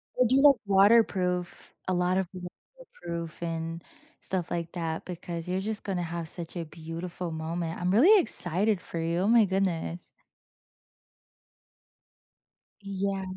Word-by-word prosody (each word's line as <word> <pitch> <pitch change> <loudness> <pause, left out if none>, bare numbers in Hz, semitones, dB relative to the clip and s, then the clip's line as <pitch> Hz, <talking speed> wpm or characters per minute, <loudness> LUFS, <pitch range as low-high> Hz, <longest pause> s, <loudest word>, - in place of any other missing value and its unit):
Or 250 - +3
do 265 +3 +3
like 285 -2 +7
waterproof, 195 -3 +2
a 185 - +1
lot 180 +1 +1
of 190 -2 -1 0.5
waterproof 170 - -8
and, 165 0 -4 0.4
stuff 180 -3 -1
like 170 -1 -3
that, 165 -2 -4
because 170 -1 -6
you're 185 +1 -1
just 215 +1 -2
gonna 185 -3 -2
have 170 0 -5
such 170 +1 -4
a 165 - -3
beautiful 165 +2 -6
moment. 165 +1 -4
I'm 180 +1 0
really 360 - +7
excited 190 - +3
for 165 - -6
you. 165 +1 -1
Oh 195 - +1
my 230 -2 +6
goodness. 180 -3 -2 2.7
Yeah. 195 0 -3
180 Hz, 135 wpm, -28 LUFS, 170-195 Hz, 2.7 s, like